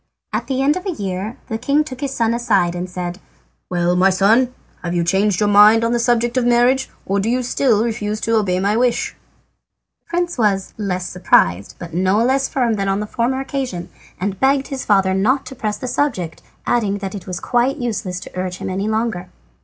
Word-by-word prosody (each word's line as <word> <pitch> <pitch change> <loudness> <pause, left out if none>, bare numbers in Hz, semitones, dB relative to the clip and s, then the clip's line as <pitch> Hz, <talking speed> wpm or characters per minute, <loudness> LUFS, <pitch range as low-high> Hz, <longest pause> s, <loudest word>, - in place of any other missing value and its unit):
At - - -2
the 265 0 0
end 290 +3 +3
of 370 +2 -5
a - - 0
year 200 - -4
the 225 - -3
king 280 +5 +2
took 260 -4 -9
his 280 -2 -2
son 230 -3 +1
aside, 205 -8 +1
and 180 +1 -4
said: 180 0 -5 0.5
"Well, 175 0 +1
my 185 +2 +4
son, 220 +7 +3 0.3
have 175 0 -3
you 170 - +1
changed 190 +2 +1
your 210 - +2
mind 210 +2 +7
on 230 - +1
the 240 - +1
subject 240 +1 +1
of 255 - +3
marriage, 245 +2 +3 0.2
or 200 +1 0
do 205 +3 0
you 250 +1 +1
still 240 -3 +2
refuse 215 -2 -2
to 230 - +1
obey 190 -4 +1
my 200 +3 +1
wish?" 240 0 +1 0.8
The - - -54
prince 345 -4 -1
was 195 -4 +1
less 185 -4 -2
surprised 100 - +2
but 170 -1 -9
no 190 +5 +2
less 270 +1 +1
firm 235 -5 0
than 195 -1 -1
on 195 +1 +1
the 210 - -2
former 240 +5 -1
occasion, 260 -10 -4 0.3
and 195 +1 -3
begged 270 0 +2
his 270 -2 -4
father 195 -2 +3
not 235 +9 +1
to 265 - -9
press 210 -3 -2
the 255 - -5
subject, 230 - -1 0.2
adding 210 -4 +1
that 195 -1 -5
it 195 -3 -8
was 180 -1 -4
quite 245 +3 +1
useless 205 -8 -3
to - - -10
urge 185 0 -3
him - - -5
any 195 +3 -2
longer. 220 -4 -2
215 Hz, 215 wpm, -19 LUFS, 190-245 Hz, 0.8 s, mind